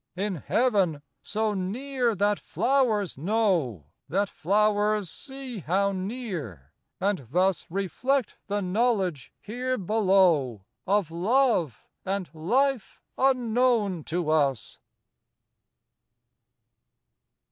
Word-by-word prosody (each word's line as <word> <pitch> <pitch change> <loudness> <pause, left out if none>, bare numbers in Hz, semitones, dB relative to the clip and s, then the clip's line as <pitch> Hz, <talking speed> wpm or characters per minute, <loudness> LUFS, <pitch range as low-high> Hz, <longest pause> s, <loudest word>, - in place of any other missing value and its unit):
In 195 0 -2
Heaven! 195 - +1 0.2
so 215 0 -1
near 235 +5 -1
that 205 +2 +1
flowers 235 - 0
know! 170 - 0 0.2
That 195 +4 0
flowers 210 +1 +1
see 265 -4 -7
how 195 +4 +1
near! 185 - -5 0.3
and 190 - -1
thus 185 +5 +1
Reflect 210 +8 -1
the 205 0 -1
knowledge 190 - 0
here 255 +4 -3
below 185 - +2 0.2
Of 195 -4 +1
love 185 - +1 0.2
and 195 -1 -3
life 245 - 0 0.2
unknown 240 - +2
to 165 -1 -1
us. 140 -6 0
200 Hz, 90 wpm, -26 LUFS, 175-230 Hz, 0.3 s, below